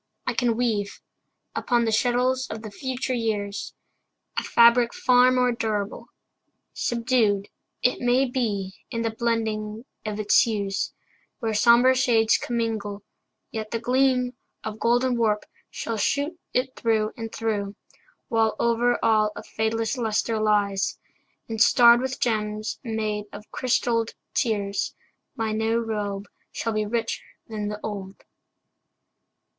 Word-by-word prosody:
I - - 0
can 240 -3 +1
weave 215 -5 -1 0.5
Upon 240 -2 +1
the 225 - +1
shuttles 250 +3 +1
of 220 - -6
the 215 - -7
future 260 +3 -3
years 210 -4 -2 0.6
A - - -7
fabric 235 0 +5
far 250 0 +5
more 250 -1 +3
durable. 215 -3 -3 0.7
Subdued, 230 -4 +1 0.3
It 250 - +2
may 245 +2 +3
be, 215 -7 -2 0.2
in 230 0 -2
the 225 - 0
blending 220 -1 -2 0.2
of 215 -1 -4
its 210 -1 +4
hues, 200 -3 0 0.5
Where 225 -3 -2
somber 235 +4 +6
shades 235 -4 +3
commingle, 220 -4 -2 0.5
yet 220 -1 -4
the 230 - -1
gleam 250 +1 +2 0.3
Of 220 0 -5
golden 245 +1 +2
warp 215 -2 +1 0.2
shall 230 -1 -4
shoot 285 - 0 0.2
it 255 +1 -1
through 220 -2 +1
and 225 -1 -6
through, 210 -3 -2 0.5
While 225 -2 +2
over 235 +1 +2
all 215 -1 +3
a - - -7
fadeless 225 +3 -1
luster 220 0 0
lies, 205 -2 +1 0.5
And 225 -1 -3
starred 235 0 +7
with 260 0 -3
gems 215 -2 -1
made 215 -3 -2
out 205 - -9
of - - -49
crystalled 230 -2 0 0.2
tears, 205 -3 -1 0.4
My 225 -3 -1
new 220 +1 +1
robe 205 -3 -3 0.3
shall 225 - -2
be 215 -1 0
richer 230 +1 -2 0.3
than 215 -2 -4
the 210 0 -4
old. 200 -2 -6
225 Hz, 135 wpm, -25 LUFS, 215-240 Hz, 0.7 s, starred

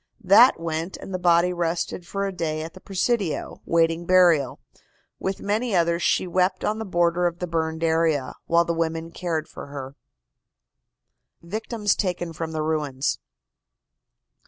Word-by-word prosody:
That 205 +5 +7
went, 165 +2 -3
and 195 - -9
the 185 - -2
body 175 0 +3
rested 170 0 -2
for 200 0 -2
a 195 - -2
day 160 -4 -3
at 160 - -8
the - - -12
Presidio, 195 -3 -1
waiting 165 0 +2
burial. 175 -7 +4 0.6
With 190 0 -3
many 215 +2 0
others, 170 0 +2
she - - +2
wept 185 +1 0
on 215 +1 -1
the 220 - -4
border 175 0 +2
of 170 0 -4
the 180 - -3
burned 160 -1 -2
area, 160 -5 +1
while 170 0 +4
the 170 - -1
women 165 0 -2
cared 165 -3 -3
for - - -9
her. 140 -1 -7 1.5
VICTIMS 210 +3 -1
TAKEN 175 -3 -2
FROM 160 0 -4
THE 155 -1 -2
RUINS. 150 -4 -1
170 Hz, 155 wpm, -24 LUFS, 160-185 Hz, 1.5 s, That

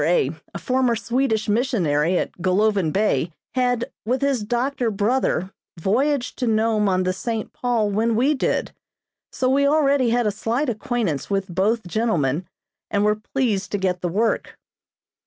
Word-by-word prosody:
a 155 -4 +2 0.3
former 255 -2 +1
Swedish 230 -1 0
missionary 185 - +1
at - - -1
Golovin 190 -2 +2
Bay, 175 -6 +1 0.2
had, 245 0 0
with 255 +5 -1
his 275 -4 +1
doctor 240 +3 -1
brother, 205 -3 0 0.3
voyaged 250 - 0
to 250 - 0
Nome 220 -2 +2
on 185 0 +1
the 185 0 0
"St. 220 +3 -4
Paul" 235 -4 0
when 225 +3 +1
we 265 +7 +3
did, 265 - -1 0.6
so 255 - -1
we 280 +2 +3
already 280 -4 +3
had 240 0 +2
a 210 - +2
slight 240 +7 -1
acquaintance 225 - -2
with 195 -2 -2
both 210 +4 +1
gentlemen 175 - 0 0.4
and 205 0 +1
were 210 0 +1
pleased 220 -7 0
to - - +2
get 185 -2 -1
the 175 - -1
work. 220 +6 -1
220 Hz, 155 wpm, -22 LUFS, 190-250 Hz, 0.6 s, we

